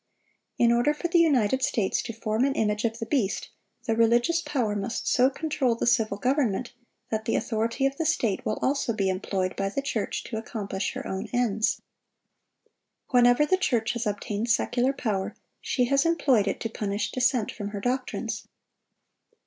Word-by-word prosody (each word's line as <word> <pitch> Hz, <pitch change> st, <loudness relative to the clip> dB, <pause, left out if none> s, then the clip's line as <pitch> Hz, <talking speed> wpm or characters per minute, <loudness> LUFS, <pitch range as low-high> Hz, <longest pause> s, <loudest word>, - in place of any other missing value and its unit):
In 235 Hz, -1 st, +4 dB
order 240 Hz, +6 st, +3 dB
for 345 Hz, +3 st, -3 dB
the 340 Hz, 0 st, +4 dB
United 265 Hz, -6 st, +3 dB
States 210 Hz, -6 st, +1 dB
to 230 Hz, -, -5 dB
form 220 Hz, +1 st, -1 dB
an 275 Hz, 0 st, +1 dB
image 210 Hz, +1 st, 0 dB
of 225 Hz, 0 st, -1 dB
the 225 Hz, -, -4 dB
beast, 225 Hz, -5 st, -1 dB, 0.3 s
the 225 Hz, -3 st, +1 dB
religious 240 Hz, +9 st, +3 dB
power 240 Hz, -10 st, -1 dB
must 205 Hz, +4 st, -3 dB
so 255 Hz, +1 st, +4 dB
control 275 Hz, -4 st, 0 dB
the -, -, -2 dB
civil 225 Hz, -4 st, +2 dB
government 250 Hz, -2 st, 0 dB, 0.4 s
that 220 Hz, -1 st, -2 dB
the -, -, 0 dB
authority 230 Hz, +3 st, 0 dB
of 275 Hz, 0 st, 0 dB
the 325 Hz, -, -1 dB
state 230 Hz, -, 0 dB
will 215 Hz, -, -1 dB
also 270 Hz, -4 st, +1 dB
be 195 Hz, -3 st, 0 dB
employed 185 Hz, 0 st, -2 dB
by 195 Hz, 0 st, -1 dB
the 275 Hz, +7 st, -3 dB
church 225 Hz, -6 st, -2 dB
to 220 Hz, -, -5 dB
accomplish 205 Hz, -3 st, -4 dB
her -, -, -6 dB
own 190 Hz, +3 st, -4 dB
ends. 220 Hz, -3 st, 0 dB, 1.3 s
Whenever 245 Hz, +3 st, +5 dB
the 375 Hz, +5 st, +2 dB
church 245 Hz, -9 st, 0 dB
has 235 Hz, -2 st, -2 dB
obtained 210 Hz, +2 st, -2 dB
secular 245 Hz, +2 st, +2 dB
power, 210 Hz, -8 st, -2 dB, 0.3 s
she 250 Hz, -, +1 dB
has 275 Hz, +3 st, +3 dB
employed 275 Hz, -11 st, +2 dB
it 195 Hz, -, -1 dB
to -, -, -1 dB
punish 210 Hz, -1 st, -3 dB
dissent 250 Hz, -3 st, +1 dB
from 205 Hz, -3 st, -6 dB
her 205 Hz, 0 st, -5 dB
doctrines. 250 Hz, +4 st, -3 dB
235 Hz, 175 wpm, -26 LUFS, 210-260 Hz, 1.3 s, Whenever